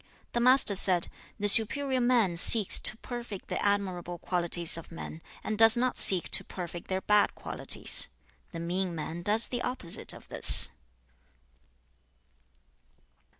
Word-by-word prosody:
XVI. - - -35
The 240 - -3
Master 250 -3 +3
said, 180 -3 +2 0.3
'The 205 - -3
superior 255 +5 +3
man 240 -7 -1
seeks 205 +4 +3
to 220 - -4
perfect 235 -5 -11
the - - -6
admirable 185 -4 -4
qualities 175 -1 -3
of 165 0 -11
men, 165 -1 -11 0.2
and 215 0 -7
does 225 +1 +5
not 250 +1 -3
seek 185 -3 +8
to - - +2
perfect 175 -2 -11
their 190 0 -5
bad 210 +1 -1
qualities. - - -4 0.4
The 165 - -10
mean 175 +1 -5
man 160 +2 -8
does 210 +5 +1
the 245 -1 -7
opposite 250 -11 -5
of - - -15
this.' - - +5
200 Hz, 145 wpm, -26 LUFS, 175-235 Hz, 0.4 s, seek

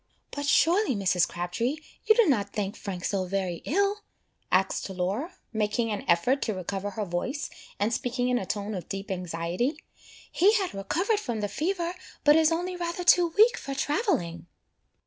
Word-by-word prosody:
"But 285 0 -4
surely, 345 - +4
Mrs. 185 -3 +2
Crabtree, 205 - -2 0.3
you 435 - +6
do 470 - +5
not 210 - +1
think 205 0 -2
Frank 185 -3 -5
so 195 -2 0
very 185 -2 -2
ill," 400 +5 +1 0.5
asked 190 +1 +1
Laura, 190 - -2 0.2
making 220 +1 0
an 210 - -3
effort 245 +12 +3
to 215 - -1
recover 195 +2 -3
her 205 +1 -4
voice, 195 - -3 0.3
and 215 +3 +1
speaking 245 +1 -1
in 250 -1 +2
a - - -4
tone 205 +2 -3
of 180 -4 -6
deep 195 0 -5
anxiety; 180 - -2 0.5
"he 395 +5 +4
had 395 -5 0
recovered 355 - 0
from 235 - -3
the 205 - 0
fever, 340 - -2 0.3
but 295 0 +7
is 320 0 +5
only 355 +2 -1
rather 345 0 -3
too 345 -1 +5
weak 445 +3 +6
for 275 - -5
travelling." 275 - -1
230 Hz, 170 wpm, -27 LUFS, -, 0.5 s, but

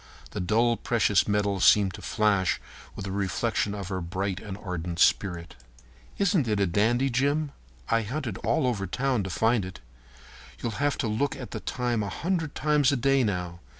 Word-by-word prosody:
The - - -4
dull 115 +6 +2
precious 110 -4 +2
metal 100 -1 +1
seemed 100 0 +5
to - - -9
flash 105 -4 +1 0.4
with 100 - -6
a 95 - -4
reflection 100 +2 -1
of 100 -3 -6
her 95 -2 -2
bright 95 +3 -3
and 100 -2 -7
ardent 90 -4 -5
spirit. 85 -2 +2 0.6
"Isn't 190 - +2
it 105 -2 +1
a 100 - +3
dandy, 115 +9 +2
Jim? 140 +4 +1 0.4
I 115 - +2
hunted 115 -1 -4
all 160 - +1
over 105 -6 -1
town 130 +4 0
to 95 - -4
find 115 +3 +2
it. 95 0 -8 0.8
You'll 115 - -2
have 145 0 +1
to 130 - -1
look 110 +7 0
at 125 - -8
the - - -4
time 120 -3 -1
a 100 - -2
hundred 165 - -2
times 150 -2 +3
a 140 - +1
day 135 +2 +3
now. 90 -5 -2
105 Hz, 185 wpm, -27 LUFS, 95-130 Hz, 0.8 s, seemed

